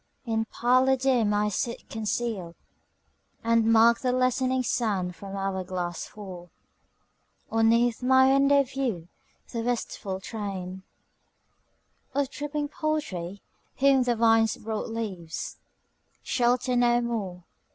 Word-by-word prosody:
In 225 Hz, -1 st, 0 dB
parlour 255 Hz, +4 st, +3 dB
dim 250 Hz, -5 st, +2 dB
I 210 Hz, 0 st, +2 dB
sit 235 Hz, +4 st, -3 dB
concealed, 215 Hz, -5 st, -3 dB, 0.9 s
And 230 Hz, 0 st, +3 dB
mark 230 Hz, +1 st, +6 dB
the 255 Hz, -, 0 dB
lessening 255 Hz, +1 st, +1 dB
sand 200 Hz, -7 st, -1 dB
from 195 Hz, +1 st, -7 dB
hour 195 Hz, -1 st, -2 dB
glass 175 Hz, -2 st, -4 dB
fall; 185 Hz, -4 st, -10 dB, 1.0 s
Or 225 Hz, -, +1 dB
'neath 230 Hz, +1 st, +3 dB
my 260 Hz, +1 st, +5 dB
window 280 Hz, +1 st, +5 dB
view 250 Hz, -11 st, -3 dB, 0.4 s
the 230 Hz, -, -3 dB
wistful 225 Hz, -5 st, -3 dB
train 190 Hz, -3 st, -5 dB, 1.3 s
Of 280 Hz, -1 st, 0 dB
dripping 295 Hz, 0 st, -3 dB
poultry, 200 Hz, -, -3 dB, 0.3 s
whom 275 Hz, -1 st, +4 dB
the 245 Hz, -1 st, +1 dB
vine's 225 Hz, -1 st, +3 dB
broad 220 Hz, 0 st, -4 dB
leaves 190 Hz, -8 st, -5 dB, 0.7 s
Shelter 250 Hz, 0 st, +1 dB
no 240 Hz, 0 st, +4 dB
more. 200 Hz, -7 st, -3 dB
230 Hz, 115 wpm, -27 LUFS, 195-255 Hz, 1.3 s, mark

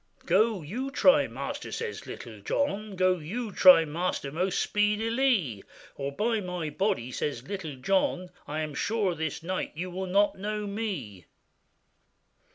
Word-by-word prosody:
'Go, 200 Hz, +1 st, +3 dB
you 245 Hz, -, -4 dB
try, 280 Hz, +1 st, +5 dB
master,' -, -, -5 dB
says 460 Hz, -1 st, -5 dB
Little -, -, -8 dB
John, 215 Hz, -7 st, -1 dB
'Go, 185 Hz, -1 st, +3 dB
you 210 Hz, +9 st, -4 dB
try, 180 Hz, -3 st, +8 dB
master, 155 Hz, -2 st, -2 dB
most 180 Hz, +5 st, 0 dB
speedilie, 210 Hz, -, +1 dB, 0.3 s
Or 140 Hz, 0 st, -3 dB
by 220 Hz, +9 st, 0 dB
my 180 Hz, -4 st, -4 dB
body,' 145 Hz, -, -1 dB
says 130 Hz, -2 st, -3 dB
Little 185 Hz, -7 st, -5 dB
John, 180 Hz, +5 st, 0 dB, 0.2 s
'I 150 Hz, +2 st, -2 dB
am 155 Hz, -1 st, -4 dB
sure 205 Hz, +4 st, 0 dB
this 160 Hz, -1 st, -4 dB
night 185 Hz, +2 st, -3 dB
you 180 Hz, +3 st, -4 dB
will 190 Hz, +1 st, -4 dB
not 200 Hz, +1 st, +2 dB
know 210 Hz, +1 st, -3 dB
me. 185 Hz, -, -4 dB
185 Hz, 145 wpm, -28 LUFS, 155-215 Hz, 0.3 s, try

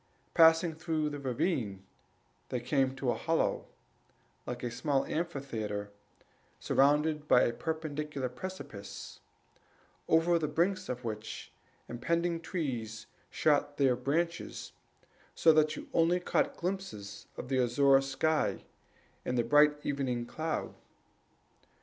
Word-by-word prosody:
Passing 165 Hz, 0 st, +6 dB
through 155 Hz, -1 st, -1 dB
the 145 Hz, -, -5 dB
ravine, 125 Hz, -, -1 dB, 0.7 s
they 125 Hz, -, -1 dB
came 130 Hz, +1 st, +1 dB
to 135 Hz, -2 st, 0 dB
a -, -, -1 dB
hollow, 165 Hz, 0 st, 0 dB, 0.8 s
like 125 Hz, 0 st, -5 dB
a 120 Hz, -, -2 dB
small 140 Hz, +2 st, 0 dB
amphitheatre, 115 Hz, -11 st, -3 dB, 0.7 s
surrounded 150 Hz, +2 st, +2 dB
by 125 Hz, -3 st, +5 dB
perpendicular 150 Hz, -2 st, -3 dB
precipices, 125 Hz, -, -8 dB, 0.9 s
over 165 Hz, +1 st, +4 dB
the 155 Hz, -, -1 dB
brinks 185 Hz, +4 st, 0 dB
of 125 Hz, 0 st, -4 dB
which 110 Hz, -1 st, -6 dB, 0.4 s
impending 170 Hz, +7 st, -1 dB
trees 120 Hz, -, -4 dB, 0.2 s
shot 145 Hz, -1 st, +1 dB
their 135 Hz, -3 st, +4 dB
branches, 165 Hz, +7 st, -2 dB, 0.6 s
so 160 Hz, -, +6 dB
that 155 Hz, 0 st, +3 dB
you -, -, -8 dB
only 170 Hz, +2 st, +3 dB
caught 175 Hz, -, 0 dB
glimpses 170 Hz, -, -5 dB
of -, -, -6 dB
the 130 Hz, -1 st, +2 dB
azure 135 Hz, +3 st, +4 dB
sky 135 Hz, +4 st, 0 dB, 0.6 s
and 125 Hz, -, -1 dB
the 120 Hz, -, +3 dB
bright 150 Hz, +5 st, +5 dB
evening 130 Hz, -4 st, -1 dB
cloud. 160 Hz, +6 st, -3 dB
145 Hz, 115 wpm, -31 LUFS, 125-160 Hz, 0.9 s, Passing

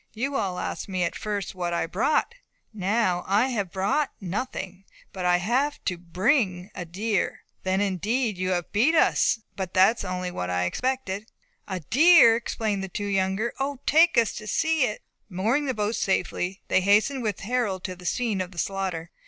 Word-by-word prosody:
"You 270 Hz, +5 st, -2 dB
all 185 Hz, -7 st, -1 dB
asked 170 Hz, -, -4 dB
me 185 Hz, -2 st, -1 dB
at 170 Hz, -, -1 dB
first 205 Hz, -2 st, -3 dB
what 175 Hz, -2 st, -3 dB
I 170 Hz, -, 0 dB
had 165 Hz, -, -4 dB
brought. 300 Hz, -, +1 dB, 0.4 s
Now, 195 Hz, -2 st, 0 dB
I 210 Hz, +7 st, +3 dB
have 205 Hz, -8 st, -2 dB
brought 200 Hz, +10 st, 0 dB
nothing; 195 Hz, -1 st, -5 dB, 0.3 s
but 185 Hz, -2 st, -4 dB
I 180 Hz, 0 st, +4 dB
have 255 Hz, +10 st, 0 dB
to 180 Hz, -, 0 dB
bring 185 Hz, -, 0 dB
a 180 Hz, -, -6 dB
deer." 200 Hz, +4 st, -1 dB, 0.2 s
"Then, 190 Hz, +1 st, 0 dB
indeed, 210 Hz, +4 st, 0 dB
you 185 Hz, 0 st, -2 dB
have 175 Hz, -2 st, -1 dB
beat 255 Hz, +11 st, +3 dB
us," -, -, +4 dB
said 225 Hz, -, +2 dB
Robert; -, -, -40 dB
"but 185 Hz, -2 st, -4 dB
that 190 Hz, +5 st, +5 dB
is -, -, -3 dB
only 180 Hz, -1 st, -3 dB
what 90 Hz, -, -4 dB
I 90 Hz, 0 st, 0 dB
expected." 220 Hz, -, -2 dB, 0.4 s
"A 185 Hz, -2 st, -4 dB
deer!" 265 Hz, -, +6 dB
exclaimed 220 Hz, -3 st, -2 dB
the -, -, -3 dB
two 205 Hz, +3 st, -4 dB
younger. 195 Hz, +3 st, 0 dB
"O, 275 Hz, +1 st, -2 dB
take 335 Hz, +3 st, +5 dB
us 230 Hz, -2 st, +3 dB
to 215 Hz, -, -8 dB
see 315 Hz, +2 st, +2 dB
it!" 215 Hz, -3 st, -4 dB, 0.3 s
Mooring 220 Hz, +10 st, 0 dB
the 260 Hz, -, -1 dB
boat 210 Hz, +1 st, -1 dB
safely, 190 Hz, -1 st, -1 dB
they 190 Hz, -, +3 dB
hastened 210 Hz, +8 st, +3 dB
with 215 Hz, -5 st, -2 dB
Harold 210 Hz, -4 st, -1 dB
to 185 Hz, -, -4 dB
the 180 Hz, 0 st, -8 dB
scene 225 Hz, -6 st, 0 dB
of 180 Hz, -1 st, -6 dB
slaughter. 185 Hz, -4 st, -3 dB
200 Hz, 195 wpm, -25 LUFS, 185-235 Hz, 0.4 s, deer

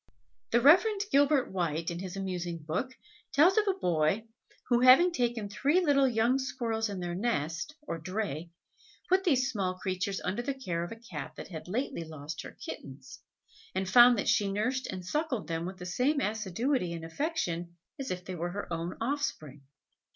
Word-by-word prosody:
The 235 Hz, -, +4 dB
Reverend 390 Hz, -, +6 dB
Gilbert 280 Hz, -1 st, +3 dB
White, 170 Hz, -3 st, -1 dB
in 170 Hz, -, -5 dB
his 190 Hz, 0 st, -6 dB
amusing 180 Hz, -3 st, -3 dB
book, 185 Hz, +12 st, -3 dB, 0.4 s
tells 330 Hz, +7 st, +6 dB
of 425 Hz, -, 0 dB
a 390 Hz, -, +2 dB
boy, 175 Hz, -, +1 dB, 0.4 s
who 240 Hz, -1 st, +3 dB
having 255 Hz, +8 st, +7 dB
taken 240 Hz, -7 st, -1 dB
three 285 Hz, -, +2 dB
little 285 Hz, -6 st, +4 dB
young 240 Hz, +2 st, +2 dB
squirrels 230 Hz, -4 st, -2 dB
in 200 Hz, -2 st, -4 dB
their 175 Hz, -1 st, -3 dB
nest 180 Hz, -, -2 dB
or 170 Hz, -, -4 dB
"dray," 175 Hz, -2 st, -3 dB, 0.6 s
put 375 Hz, +1 st, +4 dB
these 270 Hz, -7 st, +2 dB
small 190 Hz, -5 st, -1 dB
creatures 190 Hz, +1 st, -2 dB
under 190 Hz, +6 st, -2 dB
the 270 Hz, +2 st, -3 dB
care 175 Hz, -11 st, -3 dB
of 175 Hz, -, -6 dB
a -, -, -5 dB
Cat 185 Hz, -12 st, -8 dB
that -, -, -8 dB
had 160 Hz, -3 st, -8 dB
lately 225 Hz, -1 st, -2 dB
lost 155 Hz, -1 st, -7 dB
her -, -, -8 dB, 0.2 s
kittens, 135 Hz, -1 st, -9 dB, 0.6 s
and 190 Hz, 0 st, -1 dB
found 240 Hz, +4 st, +8 dB
that -, -, -1 dB
she 200 Hz, -1 st, +2 dB
nursed 250 Hz, +6 st, -1 dB
and 185 Hz, -2 st, -6 dB
suckled 260 Hz, -, -2 dB
them 165 Hz, +1 st, -2 dB
with 185 Hz, 0 st, -7 dB
the 180 Hz, -, -8 dB
same 255 Hz, +11 st, +1 dB
assiduity 215 Hz, -2 st, -1 dB
and 165 Hz, -1 st, -6 dB
affection 175 Hz, -, -3 dB, 0.2 s
as 270 Hz, -, -4 dB
if 180 Hz, 0 st, -4 dB
they 185 Hz, -, -5 dB
were 175 Hz, 0 st, -3 dB
her 205 Hz, -3 st, -5 dB
own 165 Hz, +2 st, -3 dB
offspring. 225 Hz, -, -3 dB
205 Hz, 180 wpm, -30 LUFS, 175-260 Hz, 0.6 s, found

